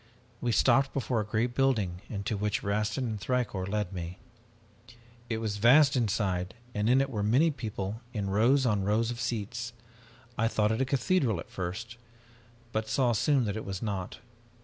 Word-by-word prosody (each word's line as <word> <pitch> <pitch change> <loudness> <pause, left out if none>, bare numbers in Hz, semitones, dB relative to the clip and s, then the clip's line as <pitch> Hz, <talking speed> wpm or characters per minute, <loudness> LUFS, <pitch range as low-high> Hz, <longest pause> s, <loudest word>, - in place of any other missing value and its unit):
We 120 - 0
stopped 135 +4 +3
before 125 -3 0
a - - 0
great 115 +3 -1
building 110 -10 +1
into 105 +1 -3
which 105 +1 -1
Rastin 105 +5 0
and 110 -3 -4
Thicourt 105 -5 -1
led 105 -2 -2
me. 90 0 -5 1.1
"It 110 - 0
was 110 -2 -2
vast 135 +7 +6
inside 95 -6 0 0.2
and 105 +2 0
in 130 +2 +5
it 135 - -1
were 105 -4 -2
many 130 +11 +3
people 110 -4 -5
in 100 -5 -3
rows 125 +7 +4
on 105 -5 +1
rows 110 +4 +1
of 120 - -5
seats. 115 +2 -3 0.7
I 115 - +3
thought 105 -1 +1
it 110 - 0
a - - +3
cathedral 130 - +1
at - - -9
first 105 +6 -5 0.7
but 110 0 -2
saw 125 -1 +2
soon 130 +3 +2
that 100 -1 -2
it 110 - -4
was 95 +1 -5
not. 100 -4 -3
110 Hz, 175 wpm, -29 LUFS, 100-125 Hz, 1.1 s, vast